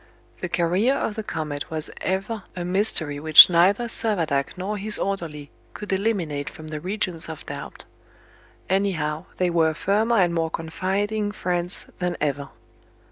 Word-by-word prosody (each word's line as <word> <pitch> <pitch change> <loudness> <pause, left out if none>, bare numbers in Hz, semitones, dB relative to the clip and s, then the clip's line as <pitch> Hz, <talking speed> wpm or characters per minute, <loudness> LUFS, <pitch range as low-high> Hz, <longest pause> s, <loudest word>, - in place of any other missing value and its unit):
The 185 - -4
career 180 +10 +2
of 225 - -2
the 220 - -4
comet 155 -7 -5
was 160 -1 -3
ever 195 +4 -2
a 175 -1 -4
mystery 180 -6 +1
which 155 +3 +9
neither 185 +7 +4
Servadac 180 -12 -1
nor 200 +3 -3
his 210 +2 +1
orderly 160 -7 -4 0.2
could 210 -2 -4
eliminate 185 -9 -1
from 155 0 -11
the 155 -1 -5
regions 180 -2 -2
of 160 - -8
doubt. - - -8 0.8
Anyhow, 175 -5 -1
they 180 -1 +1
were 160 -2 +2
firmer 215 +7 +1
and 175 -3 +3
more 165 -1 0
confiding 195 +6 -2
friends 180 -3 -1
than 180 -1 -2
ever. 145 -2 -2
180 Hz, 145 wpm, -24 LUFS, 160-200 Hz, 0.8 s, which